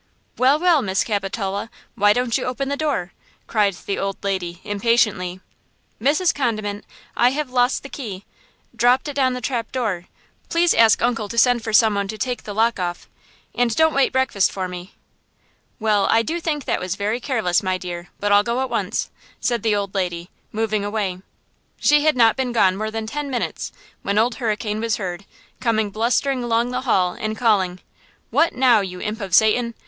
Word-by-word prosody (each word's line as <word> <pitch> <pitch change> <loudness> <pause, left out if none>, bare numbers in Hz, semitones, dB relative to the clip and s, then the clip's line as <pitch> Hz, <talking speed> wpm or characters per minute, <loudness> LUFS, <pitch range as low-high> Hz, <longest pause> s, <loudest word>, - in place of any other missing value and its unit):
"Well–well–Miss 275 - +3
Capitola, 200 0 -3 0.2
why 205 -3 +4
don't 245 +1 +1
you 265 - 0
open 260 +2 -2
the 285 - 0
door?" 280 - -2 0.3
cried 205 -4 +1
the 200 - -2
old 195 0 -2
lady, 180 -3 -2
impatiently. 205 -4 +1 0.6
"Mrs. 305 +8 +2
Condiment, 215 -6 -2 0.3
I 245 - +4
have 280 0 -3
lost 250 +1 +2
the 275 - -8
key–dropped 245 +3 -2
it 290 - -4
down 265 -2 +2
the 250 - -5
trap 235 -4 -3
door. 210 -9 -2 0.4
Please 340 +1 +3
ask 225 -2 +5
uncle 230 -4 0
to 235 - -6
send 240 0 +4
for 220 - -3
some 215 0 +5
one 200 -1 -1
to 215 - -6
take 245 0 -3
the 205 - -6
lock 230 0 +2
off–and 220 +6 -4
don't 320 0 +4
wait 275 -1 +2
breakfast 260 -7 +1
for 190 -1 -3
me." 180 +1 -9 0.8
"Well, 215 -2 +2
I 230 - +4
do 330 +7 -2
think 300 -4 -2
that - - 0
was 185 -1 -3
very 210 +4 -1
careless, 225 -10 0
my 185 -1 -1
dear; 175 -1 -7
but 205 0 0
I'll 205 0 +6
go 235 +4 -1
at 265 - -3
once," - - -2 0.3
said 240 -3 0
the 220 -1 +1
old 200 -1 -2
lady, 175 -2 -3 0.2
moving 215 -1 -1
away. 205 -3 -2 0.6
She 295 0 +4
had 310 -4 +3
not 225 -2 +5
been 260 -2 -2
gone 190 -5 +3
more 215 +2 -3
than 220 0 -4
ten 290 +5 -4
minutes, 250 -3 -3 0.3
when 200 +1 -1
Old 230 +3 +3
Hurricane 215 -1 -1
was 230 -1 0
heard, 185 -1 -5 0.3
coming 220 -4 0
blustering 245 +4 0
along 235 +1 +1
the 250 0 -2
hall 180 -3 +3
and 215 0 -4
calling: 190 -6 +1 0.5
"What 335 - +3
now, 250 -3 +5
you 180 -2 -6
imp 215 +3 -4
of 190 -3 0
Satan? 230 +3 +3
220 Hz, 185 wpm, -21 LUFS, 200-250 Hz, 0.8 s, I'll